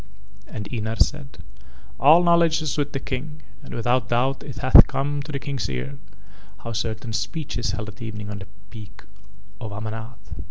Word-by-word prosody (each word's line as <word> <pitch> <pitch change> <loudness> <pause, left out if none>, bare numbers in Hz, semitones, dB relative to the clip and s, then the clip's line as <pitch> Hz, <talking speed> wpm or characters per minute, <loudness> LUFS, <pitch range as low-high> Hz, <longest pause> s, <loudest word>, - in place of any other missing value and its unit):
And 105 -2 -6
Ynar 110 -1 -2
said: 135 -11 0 0.6
"All 155 +6 +7
knowledge 170 -2 +4
is 155 - -1
with 145 -1 -1
the 135 - -2
King, 150 +4 -5 0.2
and - - -9
without 120 +1 +1
doubt 130 +3 +1
it 135 -5 -8
hath 130 +1 +8
come 145 +1 -1
to 150 - -7
the 140 - -2
King's 135 - -3
ears 65 +2 -4 0.6
how 115 - -4
certain 110 0 -3
speech 155 +2 -3
is 120 0 -1
held 105 0 -4
at 105 +1 -13
evening 105 -2 -5
on 100 - -5
the 95 - -9 0.2
Peak 105 -3 -11 0.6
of 110 -4 -6
Amanath. 110 +1 -7
120 Hz, 175 wpm, -24 LUFS, 110-140 Hz, 0.6 s, hath